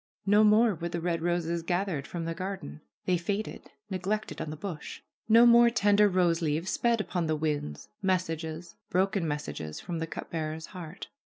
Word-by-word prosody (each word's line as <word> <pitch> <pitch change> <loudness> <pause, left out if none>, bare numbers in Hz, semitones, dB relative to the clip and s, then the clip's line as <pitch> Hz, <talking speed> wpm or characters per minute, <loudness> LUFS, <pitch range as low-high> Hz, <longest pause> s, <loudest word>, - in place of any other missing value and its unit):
No 205 +2 +5
more 215 +1 +5
were 170 0 -4
the 170 - -3
red 170 -1 -1
roses 170 0 0
gathered 175 -4 -1
from 170 -2 -4
the 165 - -2
garden. 185 - -6 0.2
They 180 -2 +2
faded, 200 +5 -4 0.2
neglected 200 +1 -3
on 160 - -4
the 155 - -5
bush. 160 -1 -7 0.3
No 230 +2 +8
more 235 0 +7
tender 205 -2 +4
rose 175 -2 +2
leaves 160 +3 0
sped 235 -1 +2
upon 180 -5 -1
the 155 - +1
winds, 150 - -2
messages, 170 -3 -2 0.2
broken 190 -1 +1
mes 150 0 -2
sages 75 -1 -6
from 175 -2 -4
the 165 - -2
cup 160 - -7
bearer's 160 0 -3
heart. 175 -2 -9
175 Hz, 180 wpm, -29 LUFS, 160-200 Hz, 0.3 s, No